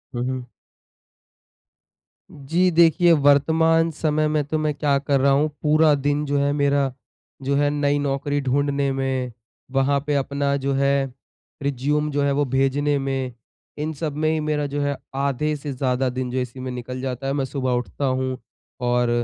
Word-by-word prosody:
हुँ, 120 - -1
हुँ। 130 -1 -4 1.9
जी, 165 +7 +1
देखिए 170 +1 +5
वर्तमान 160 +3 +4
समय 155 0 0
में 150 -1 +1
तो 155 +2 -1
मैं 155 -1 0
क्या 140 -1 +1
कर 140 -1 +1
रहा 140 0 +4
हूँ 150 +3 +3
पूरा 155 0 +4
दिन 145 +2 0
जो 145 0 0
है 140 0 +2
मेरा, 140 -2 +1 0.5
जो 140 +1 0
है 145 0 +3
नई 145 0 +1
नौकरी 145 +1 -1
ढूँढने 140 +1 0
में, 130 -2 -2 0.4
वहाँ 135 +1 +2
पे 145 - +1
अपना 140 +1 0
जो 135 0 -1
है 140 -1 +1 0.5
रिज़्युम 145 +2 0
जो 145 0 0
है 140 - +2
वो 145 +1 +1
भेजने 135 +3 +1
में, 135 -2 -2 0.4
इन 155 +2 -3
सब 150 0 -4
में 155 +1 +1
ही 160 0 +1
मेरा 150 -1 -1
जो 145 +1 -3
है 145 -1 -1 0.2
आधे 140 +2 0
से 145 0 -6
ज़्यादा 130 0 0
दिन 125 0 -3
जो 130 - -3
इसी 125 +1 -5
में 130 0 -4
निकल 125 +1 -6
जाता 135 0 -4
है। 135 - 0
मैं 135 -2 0
सुबह 130 -2 -2
उठता 125 +3 -2
हूँ 130 0 -1 0.5
और 120 0 +2
140 Hz, 180 wpm, -23 LUFS, 135-150 Hz, 1.9 s, देखिए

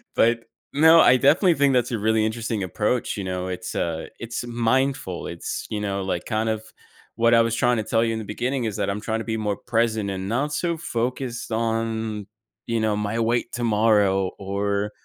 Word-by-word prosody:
But, 115 0 +3 0.3
no, 160 +3 +7
I 130 - +6
definitely 160 +6 +4
think 140 -1 +3
that's 125 -1 +1
a 115 - 0
really 110 +1 +2
interesting 110 -1 -2
approach, 105 +6 -1
you 100 - -3
know, 90 0 -3
it's, 90 0 -5
uh, 80 -1 -2
it's 120 +1 -4
mindful, 120 -4 0
it's, 85 - -5
you 105 -1 -2
know, 100 -1 -2
like, 90 -2 -3
kind 110 0 -1
of 110 -1 -1 0.5
what 115 0 +3
I 115 - +7
was 115 0 +1
trying 120 -1 +2
to 110 - -1
tell 115 +1 +1
you 115 -1 0
in 110 - -3
the 110 - -6
beginning 120 +4 -2
is 110 - -2
that - - -1
I'm 100 +1 -2
trying 110 0 -2
to - - -5
be 110 -1 -2
more 105 -2 -1
present 115 -3 0
and 95 +1 -4
not 145 +6 -1
so 170 0 -1
focused 125 -3 -3
on, 110 -2 -2 0.4
you 115 -1 0
know, 110 -1 +1
my 105 +2 -2
weight 120 +1 0
tomorrow 105 -5 +2
or, 100 +1 -2
115 Hz, 205 wpm, -24 LUFS, 105-120 Hz, 0.5 s, no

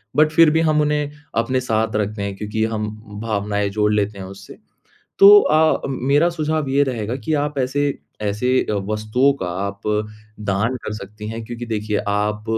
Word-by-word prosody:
But 155 +1 +5
फिर 165 0 +6
भी 160 - +2
हम 155 -2 +2
उन्हें 150 -1 0 0.3
अपने 130 +3 +1
साथ 110 -2 -1
रखते 105 0 -2
हैं 100 -1 -4
क्योंकि 105 +2 -3
हम 110 -1 -2 0.3
भावनाएँ 105 -2 -1
जोड़ 105 +1 +1
लेते 105 -1 0
हैं 95 - -6
उससे। 100 +1 -11 0.6
तो 205 +1 +10
अ 155 - +1 0.3
अ, - - -3
मेरा 140 +5 +2
सुझाव 155 -3 -2
ये 140 +1 +3
रहेगा 120 -2 -3
कि 155 +4 -2
आप 150 -1 -4
ऐसे 140 +2 0 0.2
ऐसे 105 +4 -1 0.4
वस्तुओं 110 +6 +2
का - - -2 0.2
आप 100 0 -7 0.6
दान 105 +5 0
कर 105 - -4
सकती 105 +1 -9
हैं, 115 +1 -5
क्योंकि 120 +1 -7
देखिए 105 -1 -2
आप 105 +1 -1
110 Hz, 175 wpm, -20 LUFS, 105-140 Hz, 0.6 s, तो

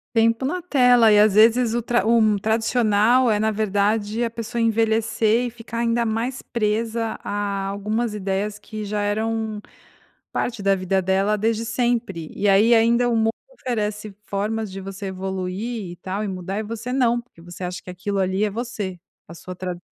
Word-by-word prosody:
Tem 225 0 +5
pela 270 +10 -3
tela 250 -8 +5
e 210 - +6
às 210 -1 +5
vezes 230 +2 +5
o 240 - 0
tra 235 -3 +1
um 220 -2 +4
tradicional 225 +2 +2
é 210 - +1
na 220 +1 +2
verdade 210 +1 0
a - - -1
pessoa 230 +1 -4
envelhecer 225 +1 +2
e - - -2
ficar 235 0 -9
ainda 235 0 +1
mais 230 +4 -2
presa 225 0 -1
a 200 -1 -2
algumas 210 +3 -2
ideias 205 +1 -2
que 215 0 -7
já 210 0 -3
eram 220 +1 -2 0.7
parte 240 -3 -2
da 195 0 +3
vida 190 0 0
dela 195 +3 +1
desde 225 +1 0
sempre. 230 -8 -1
E 205 - 0
aí 210 +4 +5
ainda 235 +2 +3
o 240 - +1
mundo 225 0 +2 0.2
oferece 215 - -3
formas 215 +2 -2
de 195 - -6
você 195 +1 -7
evoluir, 190 +3 -4
e - - -10
tal, 190 +4 -4
e - - -3
mudar, 190 +1 -4
e 215 - -3
você 230 +3 -5
não, 240 -2 +2
porque 235 -8 -21
você 175 +2 -11
acha 180 0 -4
que - - -10
aquilo 195 +3 -3
ali 190 +1 0
é 215 - +1
você, 210 -4 -5 0.3
a 170 - -10
sua 180 +2 -9
trad 180 -1 -5
215 Hz, 185 wpm, -22 LUFS, 200-230 Hz, 0.7 s, e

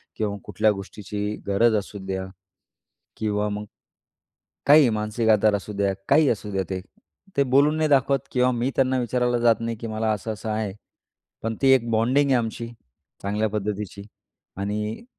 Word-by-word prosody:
किंवा 105 -2 -2
कुठल्या 110 - +2
गोष्टीची 105 +1 -5
गरज 110 +3 +3
असुद्या. 95 -2 -4 0.9
किंवा 105 -1 -1
मग 105 +1 -4 1.0
काहीही 145 -2 +7
मानसिक 110 +1 -1
आधार 105 0 +4
असुद्या, 100 0 -1 0.2
काहीही 145 0 +5
असुद्या 100 -3 -2
ते. 95 -1 -2 0.6
ते 140 - +5
बोलून 140 +4 +3
नाही 155 -1 +1
दाखवत 140 -1 +3
किंवा 125 0 +3
मी 120 +3 0
त्यांना 130 -1 +2
विचारायला 125 0 0
जात 115 -2 +3
नाही 115 0 -3
की 115 - -4
मला 110 0 -1
असं-असं 110 +1 -4
आहे. 105 -2 -2 0.7
पण 115 0 -2
ती 135 0 +6
1 120 -2 0
बॉन्डिंग 125 +6 +3
आहे 130 - +5
आमची, 115 0 -4 0.5
चांगल्या 105 +2 0
पद्धतीची. 105 -1 -4 0.5
आणि 105 - -3
110 Hz, 145 wpm, -24 LUFS, 105-125 Hz, 1.0 s, काहीही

